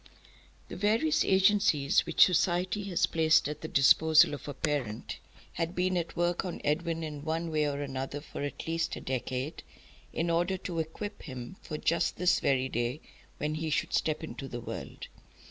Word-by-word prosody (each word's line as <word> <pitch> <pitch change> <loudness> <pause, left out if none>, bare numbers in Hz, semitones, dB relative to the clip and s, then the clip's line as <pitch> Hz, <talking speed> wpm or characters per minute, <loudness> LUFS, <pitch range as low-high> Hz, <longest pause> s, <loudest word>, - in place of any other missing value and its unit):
The - - -6
various 225 - +2
agencies 190 -7 +3
which - - +7
society 180 +3 +1
has 185 -4 +2
placed 160 -2 +3
at 150 0 -6
the 160 - -4
disposal 155 +3 +5
of 145 - -7
a 145 - -5
parent 135 -7 -3 0.3
had 165 +2 -3
been 185 +1 +1
at 170 -2 -2
work 175 0 +1
on 180 -2 -5
Edwin 165 +2 -1
in 150 -2 -6
one 165 +1 -2
way 150 -1 +1
or 140 0 -3
another 135 +1 -4
for 145 - -8
at 145 0 -5
least 165 +1 -1
a - - -6
decade, 130 +3 -3 0.5
in 170 +1 -1
order 175 +3 +1
to 180 -2 -4
equip 160 +6 -5
him 130 +1 -8
for 155 - -5
just 165 +1 +1
this 180 0 +3
very 130 -1 +1
day 120 +3 -2 0.4
when 150 +1 -2
he 160 +1 -3
should 150 - -1
step 155 0 0
into 140 -3 -6
the 120 -2 -6
world. 120 - -7
160 Hz, 180 wpm, -30 LUFS, 145-175 Hz, 0.5 s, which